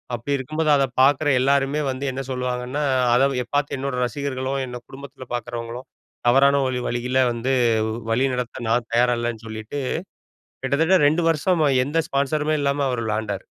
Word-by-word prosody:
அப்படி 120 +5 -3
இருக்கும்போது 155 +4 -2
அதை 135 - +3 0.2
பார்க்குற 145 +2 +4
எல்லாருமே 140 +2 +2
வந்து 130 +2 -4
என்ன 130 +1 -4
சொல்லுவாங்கன்னா, 125 +2 -2 0.3
அதை 125 0 +2
பார்த்து 145 0 0
என்னோட 135 -1 -3
ரசிகர்களும், 130 +1 -3
என்னை 125 0 -7
குடும்பத்தில 135 -1 -11
பார்க்குறவங்களும் 120 +1 -5 0.4
தவறான 140 +3 +5
வழி 125 -1 -2
வழியில 125 +2 -1
வந்து 120 +3 -2 0.6
வழி 125 +4 +2
நடத்த 125 0 -4
நான் 115 0 0
தயாரா 120 +1 +3
இல்லைன்னு 120 -1 -4
சொல்லிட்டு, 110 +5 -6 0.8
கிட்டத்தட்ட 160 +8 +3
2 155 +4 +2
வருஷமா 160 0 +1 0.2
எந்த 150 +4 0
ஸ்பான்சருமே 150 +2 0
இல்லாம 140 0 +1
அவர் 125 -2 -2
விளையாண்டார். 110 -1 -3
130 Hz, 145 wpm, -22 LUFS, 120-140 Hz, 0.8 s, தவறான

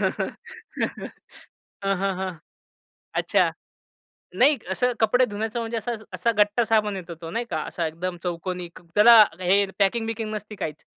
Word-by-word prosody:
हं, - - -1 1.5
हं, 195 -1 0
हं. 185 -3 -4 0.8
अच्छा, - - +2 0.9
नाही 275 +8 +4
असं 250 +5 +1
कपडे 245 +3 +4
धुण्याचं 220 +1 -3
म्हणजे 230 0 -3
असा 235 +3 -3 0.2
असा 185 +6 +1
गट्टा 210 +3 +3
साबण 215 -3 +1
येतो 175 -2 -7
तो, 165 - -6
नाही 235 +6 -2
का? - - -1
असा 170 - -2
एकदम 175 +3 -4
चौकोनी 180 0 -4
क - - -12
त्याला 220 +1 +9 0.2
हे 190 +3 +4 0.2
पॅकिंग-बिकिंग 225 +1 0
नसती 210 0 -6
काहीच. 155 -5 -5
205 Hz, 140 wpm, -24 LUFS, 185-225 Hz, 1.5 s, त्याला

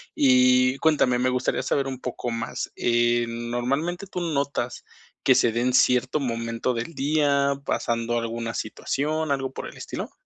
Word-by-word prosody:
Y 125 -1 +4
cuéntame, 140 -6 +2
me 125 - +2
gustaría 125 +1 0
saber 135 +1 0
un 130 -1 -5
poco 125 -1 -4
más, 115 +2 -4
eh, 120 0 +2
normalmente, 125 +11 -2
¿tú 180 -2 -5
notas 140 -6 -2 0.4
que - - +6
se 115 - +3
de 115 - -1
en 125 +1 +1
cierto 125 +3 +3
momento 115 0 -2
del 120 +8 -4
día, 140 -1 +2
pasando 115 0 -1
alguna 115 0 -3
situación, 150 +7 -2
algo 135 -1 -1
por - - -6
el - - -11
estilo? - - -6
125 Hz, 160 wpm, -25 LUFS, 120-140 Hz, 0.4 s, que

